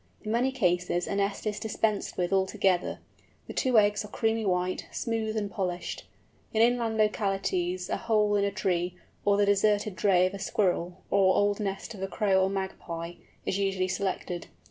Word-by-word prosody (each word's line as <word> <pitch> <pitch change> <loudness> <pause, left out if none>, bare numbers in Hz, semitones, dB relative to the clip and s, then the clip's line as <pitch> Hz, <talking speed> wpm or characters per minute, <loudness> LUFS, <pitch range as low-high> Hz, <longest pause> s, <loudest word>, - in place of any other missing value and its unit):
In 215 - -3
many 245 +3 +2
cases 180 -7 +1
a - - -3
nest 200 +1 -1
is 210 -1 -2
dispensed 215 -1 -1
with 180 +1 0
altogether. 190 -1 +1 0.5
The - - -8
two 255 -4 +2
eggs 210 0 +4
are - - -8
creamy 220 0 0
white, 180 0 0
smooth, 225 -1 -2
and 205 -2 -2
polished. 180 -3 -3 0.5
In 220 - +4
inland 235 -2 +2
localities 195 -4 0
a - - -1
hole 210 -2 +2
in 200 - +2
a 200 - +2
tree, 180 -3 -1 0.3
or 200 0 +4
the 205 - +4
deserted 205 0 +2
drey 185 -2 +4
of 185 - -1
a 200 - -6
squirrel, 180 -2 -1
or 190 -1 +4
old 205 +1 +2
nest 195 +1 -3
of 195 - -10
a 195 - -1
Crow 195 -1 +2
or 190 - +2
Magpie, 175 -3 -4 0.3
is 195 - -1
usually 190 -2 0
selected. 185 -2 -3
200 Hz, 180 wpm, -28 LUFS, 185-215 Hz, 0.5 s, eggs